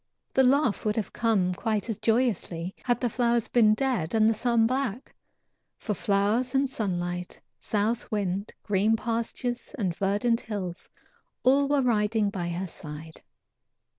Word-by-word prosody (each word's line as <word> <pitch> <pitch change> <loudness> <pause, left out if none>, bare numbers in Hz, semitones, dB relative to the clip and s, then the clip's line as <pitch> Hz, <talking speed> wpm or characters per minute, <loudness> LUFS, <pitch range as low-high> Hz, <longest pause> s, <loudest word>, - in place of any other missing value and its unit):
The 265 - +4
laugh 265 -3 +3
would 210 -1 0
have 220 - -3
come 200 -6 +1
quite 215 +2 -1
as 225 -4 -3
joyously 200 -7 0
had 245 -1 +1
the 245 - +1
flowers 235 -1 +1
been 215 -3 +4
dead 225 -9 -1
and 220 -1 +5
the 225 - +4
sun 235 0 +2
black, 255 -1 -2 0.6
for 215 - -3
flowers 210 +7 +1
and 270 +1 +3
sunlight, 180 -7 -3 0.2
south 220 +3 -1
wind, 200 -1 -2
green 210 +2 +2
pastures 235 +4 -3
and 185 -8 -1
verdant 205 +5 +1
hills, 190 -5 -5 0.5
all 275 +2 +4
were 285 -1 +2
riding 215 -3 +1
by 175 -3 -3
her 175 +2 -3
side. 155 0 -10
220 Hz, 145 wpm, -27 LUFS, 195-240 Hz, 0.6 s, and